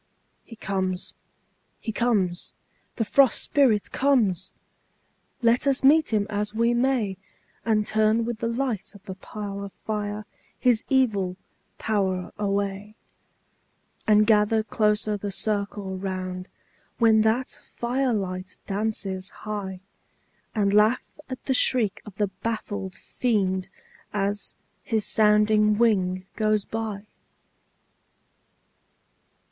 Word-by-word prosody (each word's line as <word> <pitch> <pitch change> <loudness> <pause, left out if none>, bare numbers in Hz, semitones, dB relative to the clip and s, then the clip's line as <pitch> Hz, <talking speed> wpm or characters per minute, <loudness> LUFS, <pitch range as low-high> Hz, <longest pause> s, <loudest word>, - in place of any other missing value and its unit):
He 230 - -12
comes, 190 -3 -2 0.7
he 225 - -4
comes, 205 -6 0 0.4
the 225 - 0
Frost 270 +3 +4
Spirit 245 -8 +2
comes! 220 -10 +2 0.9
Let 235 +4 +3
us 275 -1 +2
meet 300 +2 +5
him 210 -2 +2
as 210 0 -2
we 235 +1 +3
may, 240 -6 +1 0.5
And 215 -2 +2
turn 220 +2 +2
with 235 -2 -3
the 230 - -1
light 235 -4 -2
of 200 - -14
the 190 - -6
parlor 200 +1 -6 0.2
fire 210 0 -3 0.3
his 245 -4 +2
evil 205 -9 +2 0.4
power 190 -4 -1
away; 200 +1 -2 1.1
And 215 0 +6
gather 215 0 +3
closer 210 -1 +1
the 205 0 -4
circle 200 -1 -2
round, 185 -1 -4 0.5
when 220 -2 +5
that 225 +4 0
fire 250 +2 0
light 185 -3 -3
dances 195 -2 -2
high, 200 -3 -6 0.7
And 200 -2 +2
laugh 215 +4 +4 0.3
at 255 - -7
the 265 - +1
shriek 230 -5 +3
of 205 - -10
the 205 -1 0
baffled 205 -4 -3
Fiend 190 -4 -1 0.4
as 205 0 -2 0.3
his 220 -3 -1
sounding 210 0 +4
wing 185 -5 +2
goes 215 -2 +1
by! 220 -2 -4
210 Hz, 110 wpm, -25 LUFS, 195-225 Hz, 1.1 s, And